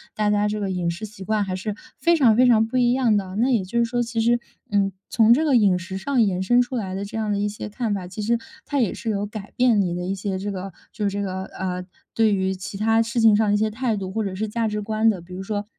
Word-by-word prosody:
大 210 -1 +1
家 210 0 +2
这 210 0 -2
个 195 -2 -2
饮 175 -2 -1
食 170 +5 -5
习 205 -2 -8
惯 215 0 +1
还 190 -2 -4
是 205 +3 -3 0.2
非 340 +5 +3
常 240 -8 +4
非 255 +1 +6
常 225 -2 +5
不 230 +3 -2
一 245 -1 +3
样 245 -5 +3
的。 190 -1 -4
那 240 +5 +2
也 225 -7 +1
就 210 +6 -4
是 235 - +4
说， 240 +1 -1
其 230 -1 -1
实， 240 +1 +3 0.3
嗯， 195 -1 +2 0.2
从 230 -2 +5
这 295 +6 +2
个 295 -4 +2
饮 200 -5 +4
食 185 +1 -6
上 250 +5 +1
延 190 -4 +1
伸 240 +6 +4
出 245 +1 -2
来 190 -4 -3
的 195 - -3
这 225 +3 -6
样 215 -1 -1
的 205 - 0
一 205 +1 0
些 210 +1 -6
看 215 0 -2
法， 190 -3 -4
其 185 +4 -7
实 230 +3 +1 0.3
它 285 - -1
也 230 -7 +1
是 230 - -5
有 205 -1 -1
改 205 -1 -8
变 240 -5 +4
你 175 -2 -1
的 180 0 -3
一 190 +2 -2
些 190 0 -3
这 205 +2 -4
个 195 0 -5 0.2
就 210 - -4
是 - - -7
这 200 +1 -3
个， 190 -1 -3
呃， 180 -1 -4 0.3
对 220 -2 +3
于 190 -1 0
其 190 +1 -7
它 225 +2 +3
事 230 +1 -2
情 225 -2 +6
上 220 - +3
的 - - +3
一 - - +3
些 215 +1 +1
态 225 0 -1
度 190 -2 -4
或 220 +1 -1
者 195 -2 -3
是 215 +3 -2
价 225 +1 -1
值 210 0 -2
观 220 +1 +2
的。 200 -4 0
比 175 +2 -12
如 185 +1 -5
说 205 +1 -3
210 Hz, 325 characters per minute, -23 LUFS, 195-230 Hz, 0.3 s, 非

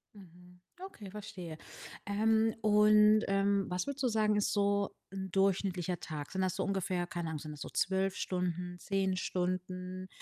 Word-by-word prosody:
Mhm. 180 -1 -16 0.2
Okay, 220 - -9
verstehe. 185 -6 -7 0.5
Ähm, 220 +2 +2
und, 210 0 +6
ähm, 195 0 +2
was 180 0 -1
würdest 280 -1 -3
du - - +4
sagen, 215 -1 +2
ist 205 - +1
so 200 -1 +2 0.2
'n 190 -1 -5
durchschnittlicher 190 -2 +1
Tag? 150 -2 -6
Sind 190 - -1
das 185 -1 0
so 190 - -1
ungefähr 185 -2 -1
keine 175 -3 -4
Ahnung, 155 - -4
sind 150 +1 -7
das 150 - -10
so - - -5
12 190 0 0
Stunden, 180 -1 -2
10 195 -2 0
Stunden, 185 0 -3
190 Hz, 165 wpm, -33 LUFS, 180-205 Hz, 0.5 s, und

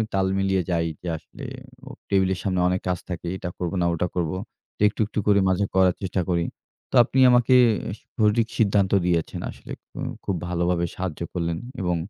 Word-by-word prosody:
তাল 95 -1 +2
মিলিয়ে 95 -1 +2
যাই, 85 -1 +1
যে 90 - -7
আসলে 135 - -11 0.4
হু 135 - -10 0.2
টেবিলের 95 -2 +2
সামনে 95 -2 0
অনেক 90 +1 0
কাজ 90 -1 +1
থাকে, 85 -1 -5
এটা 90 - -5
করবো 90 +1 -3
না - - +2
ওটা 85 +2 0
করবো। 90 0 -1 0.5
একটু, 105 - +1
একটু 105 - -3
করে 100 -1 +5
মাঝে 95 +2 +2
করার 95 -1 +4
চেষ্টা 95 -1 -1
করি। 85 -1 +1 0.5
তো - - -2
আপনি 130 - -1
আমাকে 125 +1 +5 0.6
সঠিক 110 +1 +3
সিদ্ধান্ত 100 -3 +3
দিয়েছেন 85 -2 0
আসলে, - - -10 0.2
হুম। - - -4
খুব 100 - -1
ভালোভাবে 85 0 0
সাহায্য 90 -5 -4
করলেন 85 -2 -1 0.2
এবং 90 -1 +1
95 Hz, 180 wpm, -24 LUFS, 85-100 Hz, 0.6 s, করে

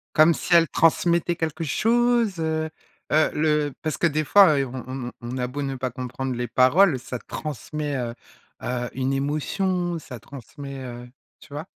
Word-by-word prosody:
Comme 155 +2 +6
si 175 - +1
elle 165 -1 +6
transmettait 170 +2 +2
quelque 160 0 -3
chose, 230 +2 +2
heu? 160 0 -1 0.4
Heu, 155 0 +4
le 150 -1 +1
parce 155 -1 -2
que - - +1
des 155 0 0
fois, 180 -2 +6
et 135 - +1
on 130 -1 -7
on 130 -1 -5
on 120 +2 -5
a 125 -1 -1
beau 140 +4 -5
ne 135 -1 -2
pas 130 0 -2
comprendre 130 +1 -4
les 120 0 -2
paroles, 130 - +4
ça 125 0 -6
transmet, 150 +2 -5
heu 120 -3 -3 0.5
heu, 120 -1 -2
une 130 +1 -1
émotion, 175 +6 -1
ça 125 -6 -9
transmet, 140 +3 -9
heu, 120 -1 -8 0.3
tu 150 - -15
vois? 150 +2 -5
145 Hz, 180 wpm, -24 LUFS, 130-165 Hz, 0.5 s, Comme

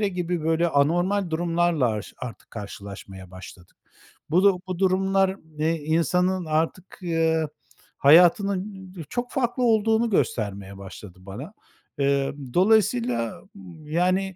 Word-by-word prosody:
gibi 175 -2 -2
böyle 165 +2 +2
anormal 175 +6 +1
durumlarla, 165 -4 +1
aş 105 -1 -6
artık 125 -3 -9
karşılaşmaya 100 -3 -9
başladık. 95 -1 -13 0.5
Bu, 175 +5 +3
du 195 -3 +4
bu 185 -2 -4
durumlar, 190 0 +2 0.2
eee, 160 +2 +1
insanın 170 +4 0
artık, 160 +4 -2
eee, 165 -2 +1 0.5
hayatının, 185 +5 +4
ı - - -5
çok 245 0 -3
farklı 250 -1 -1
olduğunu 225 0 +3
göstermeye 100 - -1
başladı 95 -1 -11
bana. 105 - -9 0.5
Eee, 140 0 +1 0.2
dolayısıyla, 125 - +2 0.4
yani 185 +4 0
165 Hz, 115 wpm, -24 LUFS, 130-190 Hz, 0.5 s, du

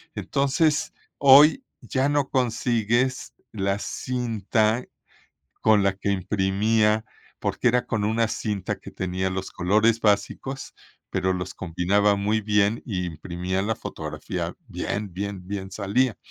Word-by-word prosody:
entonces, 145 +3 +1 0.2
hoy 145 - +7 0.2
ya 130 +1 0
no 145 -2 +1
consigues 120 0 0 0.2
la 100 -1 -1
cinta 115 -2 -1 0.8
con 110 -2 +4
la 100 -1 +2
que 100 +1 -3
imprimía, 105 +3 +1 0.3
porque - - 0
era 125 +1 +2
con 110 -3 -1
una 110 +1 +1
cinta 105 -4 -3
que - - -10
tenía 95 0 -2
los 95 0 -4
colores 105 +5 +2
básicos, 120 +6 -1 0.4
pero 95 - +1
los 90 0 -4
combinaba 95 +4 +1
muy 105 +2 0
bien 105 +1 +2
y 90 -5 -2
imprimía 90 +3 -3
la 110 +3 -1
fotografía - - -5
bien, 100 -3 -4
bien, 95 -1 -5
bien 100 -1 -5
salía, 110 +5 0
105 Hz, 125 wpm, -25 LUFS, 95-120 Hz, 0.8 s, hoy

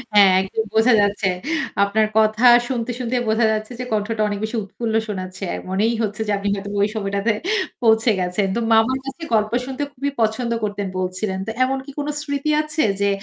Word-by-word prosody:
হ্যাঁ, 200 -2 +8
একদম 195 +3 -2
বোঝা 225 +3 +4
যাচ্ছে। 205 0 +1 0.5
আপনার 215 +2 +2
কথা 215 +2 +3 0.2
শুনতে, 245 -1 -2
শুনতেই 245 0 -1
বোঝা 220 +1 +3
যাচ্ছে 215 +2 -3
যে 250 - -3
কণ্ঠটা 215 +1 -1
অনেক 205 -1 -3
বেশি 220 +2 -3
উৎফুল্ল 220 +3 -4
শোনাচ্ছে। 185 -2 -6
অ্যা - - -2
মনেই 210 +5 +1
হচ্ছে 215 +1 -3
যে - - 0
আপনি 200 +1 -4
হয়তো 200 0 -6
ওই 205 - +4
সময়টাতে 200 +1 0 0.5
পৌঁছে 225 0 +4
গেছেন। 180 +2 0
তো - - 0
মামার 225 +4 +4
কাছে 275 +5 -7
গল্প 215 -1 +2
শুনতে 270 +2 -4
খুবই 280 +2 -3
পছন্দ 225 +2 0
করতেন 205 -1 -2
বলছিলেন। 185 +1 -2
তো - - -2
এমন 265 +1 0
কি 280 - -9
কোন 290 - -3
স্মৃতি 285 0 -2
আছে, 310 +1 -1 0.2
যে 200 - +3
220 Hz, 190 wpm, -21 LUFS, 200-245 Hz, 0.5 s, হ্যাঁ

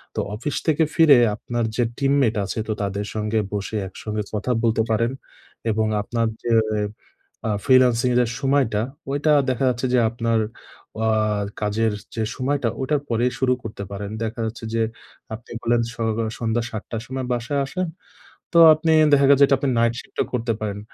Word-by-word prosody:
তো - - -1 0.2
অফিস 135 +7 -4
থেকে 160 0 +3
ফিরে 155 -5 +7 0.2
আপনার 120 +2 -3
যে 120 - +2
team 140 0 +2
mate 115 -4 +2
আছে, 105 - -4
তো 110 - 0
তাদের 100 0 -2
সঙ্গে 110 +1 0
বসে 105 +2 -3
একসঙ্গে 105 +2 -5
কথা 110 +4 -1
বলতে 115 -1 +2
পারেন। 115 +3 +1 0.6
এবং 110 0 +1
আপনার 115 +2 -1 0.2
যে 120 - -1 0.3
এ - - 0 0.7
আ - - 0 0.2
freelancing 125 -2 +4
এর - - +2
যে 120 - +1
সময়টা, 135 -6 +2 0.3
ঐটা 145 +2 +1 0.2
দেখা 130 +1 -1
যাচ্ছে 125 +1 -2
যে 125 - +5
আপনার 115 -1 0 0.7
আ - - +2 0.5
কাজের 110 +1 +1 0.2
যে 110 - -1
সময়টা 135 -2 0
ওটার 140 +2 0
পরেই 120 +2 +1
শুরু 130 -1 +3
করতে 105 -2 -6
পারেন। 100 0 -5
দেখা 110 +1 -4
যাচ্ছে 115 +1 -6
যে 115 - +1 0.5
আপনি 115 +2 -9
বললেন 120 0 +2
সকল 115 -1 -1
সন্ধ্যা 115 0 0
৭ 110 -1 -5
টার 115 -2 -3
সময় 130 0 -4
বাসায় 125 +4 -1
আসেন। 180 +6 -3 0.7
তো - - +3 0.2
আপনি 160 +1 0 0.2
দেখা 140 -1 +5
গেছে 140 0 +6
এটা 135 - +4
আপনি 140 - 0
night 115 0 +3
shift - - -15
ও - - -8
করতে 115 -1 0
পারেন। 105 -1 -3
115 Hz, 180 wpm, -22 LUFS, 110-130 Hz, 0.7 s, ফিরে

